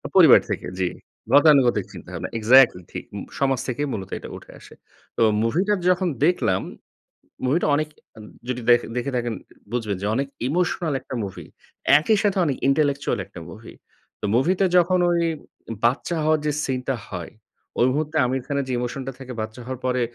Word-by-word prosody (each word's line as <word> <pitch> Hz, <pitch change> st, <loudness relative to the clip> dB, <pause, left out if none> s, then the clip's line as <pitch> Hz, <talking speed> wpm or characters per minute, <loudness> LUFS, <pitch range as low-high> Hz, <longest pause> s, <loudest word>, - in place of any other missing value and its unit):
পরিবার -, -, +8 dB
থেকে -, -, -3 dB
জি। 90 Hz, -, +1 dB, 0.5 s
গতানুগতিক 140 Hz, -4 st, +5 dB
চিন্তাভাবনা। -, -, -7 dB
এক্সাক্টলি 115 Hz, -4 st, +5 dB
ঠিক। -, -, -6 dB
মু -, -, -4 dB, 0.2 s
সমাজ 135 Hz, -2 st, +1 dB
থেকেই 145 Hz, +4 st, -2 dB
মূলত 95 Hz, -3 st, -5 dB
এটা -, -, -9 dB
উঠে -, -, -14 dB
আসে। -, -, -15 dB, 0.4 s
তো -, -, 0 dB, 0.2 s
মুভিটার 185 Hz, -, +1 dB
যখন 180 Hz, 0 st, +2 dB, 0.2 s
দেখলাম 175 Hz, -, +1 dB, 0.8 s
মুভিটা 155 Hz, +6 st, +1 dB
অনেক 155 Hz, +1 st, -1 dB, 0.3 s
আন 110 Hz, -, -10 dB, 0.2 s
যদি 125 Hz, -1 st, -3 dB
দেখ 120 Hz, 0 st, +7 dB, 0.2 s
দেখে 125 Hz, +3 st, -2 dB
থাকেন 120 Hz, -2 st, -1 dB, 0.4 s
বুঝবেন 110 Hz, -5 st, -2 dB
যে 100 Hz, -, -1 dB
অনেক 140 Hz, +1 st, -1 dB, 0.2 s
ইমোশনাল 170 Hz, 0 st, 0 dB
একটা 130 Hz, -, -7 dB
মুভি। 95 Hz, -, -7 dB, 0.5 s
একই 215 Hz, +7 st, +2 dB
সাথে 200 Hz, -1 st, +1 dB
অনেক 140 Hz, -3 st, -1 dB
intellectual 140 Hz, 0 st, +1 dB
একটা -, -, -12 dB
মুভি। -, -, -11 dB, 0.5 s
তো -, -, -4 dB
মুভিতে 180 Hz, +9 st, +2 dB
যখন 180 Hz, +1 st, +3 dB
ওই 170 Hz, -, +2 dB, 0.7 s
বাচ্চা 135 Hz, +8 st, +1 dB
হওয়ার 155 Hz, 0 st, +3 dB
যে 150 Hz, -, +1 dB
সিন 130 Hz, -1 st, -1 dB
টা 135 Hz, -, +1 dB
হয়, 90 Hz, -4 st, -6 dB, 0.5 s
ওই 120 Hz, -, +5 dB
মুহূর্তে 150 Hz, +2 st, -2 dB
আমির 130 Hz, +1 st, -1 dB
খানের 140 Hz, -1 st, -2 dB
যে 130 Hz, -, -2 dB
ইমোশনটা 130 Hz, +2 st, -4 dB
থাকে 130 Hz, -1 st, -8 dB
বাচ্চা 110 Hz, +3 st, -6 dB
হওয়ার 130 Hz, 0 st, -5 dB
পরে 125 Hz, -1 st, +1 dB
135 Hz, 170 wpm, -23 LUFS, 120-155 Hz, 0.8 s, পরিবার